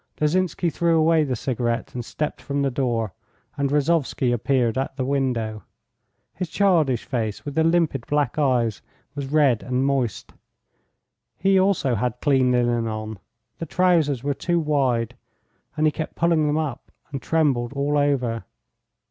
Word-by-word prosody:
Lozinsky 170 +2 +1
threw 170 0 +2
away 160 0 +4
the 130 -4 -1
cigarette 120 -1 -2
and 120 - -4
stepped 150 +5 -4
from 140 -1 -2
the 135 - +1
door. 120 -6 -1 0.4
And 140 -1 0
Rozovsky 145 -3 +1
appeared 120 -1 +1
at 135 0 -2
the 130 -2 -2
window. 125 -6 -1 0.7
His 180 -2 -4
childish 160 - +2
face, 110 -4 -3
with 145 - -4
the 160 - +2
limpid 165 -7 +1
black 150 +2 0
eyes, 120 -7 +1 0.3
was 140 -1 -5
red 140 -7 +3
and 125 +1 -1
moist. 135 -5 -1 1.0
He 195 0 +3
also 185 -9 +2
had 120 +1 -1
clean 130 -4 +3
linen 120 -2 +1
on, 110 -1 -5 0.4
the 165 - -4
trousers 165 -8 +2
were 145 0 0
too 175 +4 0
wide, 135 -7 0 0.6
and 155 - +2
he 155 - +4
kept 155 +1 -5
pulling 165 -3 +2
them 150 +1 +1
up 145 -5 -4 0.2
and 135 -2 -4
trembled 135 -7 +1
all 140 +1 0
over. 130 -6 0
140 Hz, 155 wpm, -23 LUFS, 120-155 Hz, 1.0 s, away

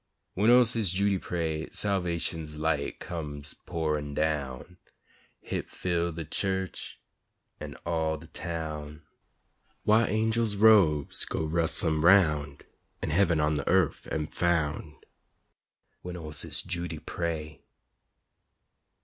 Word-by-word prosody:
When 105 +5 +3
ol' 125 0 +7
Sis' 115 -4 +1
Judy 100 +2 +1
pray, 80 -3 -3
Salvation's 85 -5 -2
light 75 -2 -1
comes 75 -5 -6
pourin' 75 -4 -2
down 75 +1 -2 0.6
Hit - - -4
fill 85 -1 -1
de 80 0 -6
chu'ch 95 +4 -2 0.6
an' - - -7
all 80 -2 0
de 80 - -12
town 80 -3 -6 0.8
Why, 110 +2 +4
angels' 110 0 +1
robes 100 -9 +5
go - - -2
rustlin' 80 0 +1
'roun', 75 -6 +4 0.5
An' - - -1
hebben 85 -1 +3
on 75 0 +2
de 70 - -2
Yurf 90 -3 +2
am 75 -1 -1
foun', 80 -2 -1 1.1
When 90 0 -6
ol' 80 -3 -7
Sis' 75 - 0
Judy 85 -2 -4
pray. 80 -2 -4
80 Hz, 115 wpm, -28 LUFS, 75-90 Hz, 1.1 s, ol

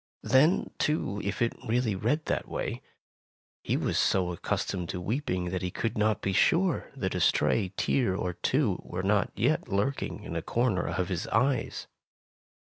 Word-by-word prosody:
Then, 150 +8 +3
too, 105 -9 0
if 100 +4 -1
it 115 - 0
really 115 -1 +1
read 120 +11 0
that - - -1
way, - - -3 0.8
he - - 0
was - - 0
so 90 -2 +2
accustomed 90 +1 -2
to 95 -1 -3
weeping 90 -4 -2
that 95 - -2
he 90 - -1
could 115 +5 -2
not 105 -1 +1
be 95 - 0
sure 170 - +2
that 95 -8 -2
a 90 - -1
stray 95 +3 +2
tear 120 -9 +1
or 90 -2 -2
two 105 - 0
were 90 +1 -5
not 100 +1 +2
yet 130 +9 +1
lurking 105 +8 -1
in - - -6
a - - -1
corner 115 -7 0
of 90 0 -1
Jiis 90 -2 -2
eyes. 125 +2 0
105 Hz, 170 wpm, -29 LUFS, 95-125 Hz, 0.8 s, Then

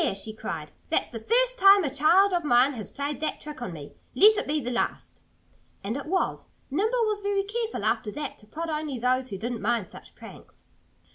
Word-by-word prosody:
she 215 +2 -4
cried. - - -6 0.2
"That's - - +1
the 230 - -6
first - - +2
time 395 0 +7
a 280 -4 -2
child 345 +7 +4
of 350 -1 0
mine 255 0 +4
has 215 -6 -7
played 285 +1 -4
that 310 - -2
trick 300 -3 -9
on 240 - -4
me.... 150 -4 -10 0.2
Let 425 - +7
it 420 - -2
be 300 +1 0
the 250 -3 -4
last!" 240 - -3 0.6
And 210 +4 -3
it 280 +1 -6
was. 375 +3 -1 0.2
Nimble 445 - +1
was 425 -1 -1
very 400 -1 0
careful, 450 +2 -3
after 215 - 0
that, 300 - -5
to 210 - -18
prod 325 +8 -5
only 305 -3 -3
those 255 +2 0
that 195 - -6
didn't 240 0 -4
mind 220 -3 -1
such - - -14
pranks. - - -14
295 Hz, 210 wpm, -26 LUFS, 240-395 Hz, 0.6 s, time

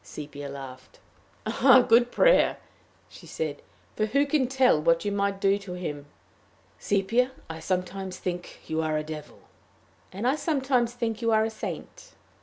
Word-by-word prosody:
Sepia 145 +5 -8
laughed. 130 -2 -10 0.5
"A 260 -2 +5
good 240 +1 +5
prayer," - - +4 0.5
she - - -14
said; 155 -3 -4 0.3
"for 215 - 0
who 280 +6 +2
can 280 -3 +1
tell 255 -10 +3
what 165 +4 +2
you 205 - 0
might 200 -1 -1
do 195 +1 +2
to 200 -3 -8
him!" 150 -5 -5 0.7
"Sepia, 225 +6 +1 0.2
I 160 0 -7
sometimes 185 +2 -3
think 175 -1 -5
you 160 0 -1
are 155 -1 0
a 155 - -2
devil." 155 -1 -8 0.7
"And 200 +6 -3
I 270 +4 +2
sometimes 265 -6 0
think 230 -2 -3
you 230 - +1
are 220 0 +4
a 225 - -3
saint." 220 - -8
195 Hz, 160 wpm, -27 LUFS, 160-240 Hz, 0.7 s, A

